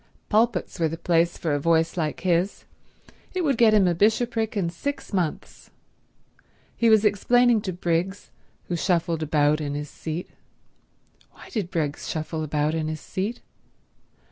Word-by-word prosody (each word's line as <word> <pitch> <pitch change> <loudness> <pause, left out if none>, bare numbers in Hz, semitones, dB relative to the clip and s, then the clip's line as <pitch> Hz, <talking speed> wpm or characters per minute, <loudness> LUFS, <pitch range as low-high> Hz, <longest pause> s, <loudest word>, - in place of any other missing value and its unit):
Pulpits 220 -5 +1
were 165 - +3
the 165 +1 -5
place 170 0 +1
for 160 -3 -1
a 145 - +1
voice 165 +2 +2
like 155 -4 -2
his; 180 +2 0 0.7
it 365 - 0
would 280 -4 +2
get 230 -1 +5
him 195 -3 +5
a 175 - +2
bishopric 220 +3 +1
in 170 -4 0
six 280 +8 -5
months. 175 -5 -3 1.1
He 235 - +3
was 220 -1 +5
explaining 240 +2 +3
to 190 - -3
Briggs, 180 +2 -2 0.3
who 175 - -3
shuffled 170 -2 0
about 150 0 +2
in 145 -1 -3
his 150 0 -5
seat—why 160 +2 -11
did 205 -8 -3
Briggs 155 -5 -3
shuffle 155 0 -3
about 150 0 0
in 160 -1 -1
his 155 0 -4
seat? 205 +10 -4
175 Hz, 150 wpm, -25 LUFS, 160-210 Hz, 1.1 s, get